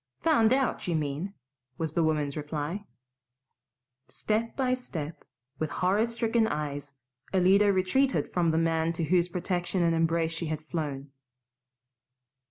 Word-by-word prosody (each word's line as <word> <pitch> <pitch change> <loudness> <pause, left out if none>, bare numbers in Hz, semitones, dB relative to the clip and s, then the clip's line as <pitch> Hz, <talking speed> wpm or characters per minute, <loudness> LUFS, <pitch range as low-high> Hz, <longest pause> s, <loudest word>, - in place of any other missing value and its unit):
"Found 245 -9 +4
out, 265 -6 +1
you 170 - +1
mean," 155 +6 -2 0.4
was 160 -2 -2
the 170 - +2
woman's 150 -3 0
reply. 150 +6 -4 1.2
Step 220 +2 -2
by 255 -2 +2
step, 170 - -5 0.4
with 155 - -1
horror 200 +5 +1
stricken 230 -1 +1
eyes, 145 -4 -4 0.4
Alida 195 +3 +5
retreated 200 +9 +1
from 175 -2 +2
the 160 - +1
man 165 0 +1
to 165 - -2
whose 175 +2 +2
protection 180 0 -1
and 165 -1 +3
embrace 165 0 +1
she 165 0 -4
had 155 0 -4
flown. 145 -4 -4
170 Hz, 135 wpm, -28 LUFS, 155-205 Hz, 1.2 s, Alida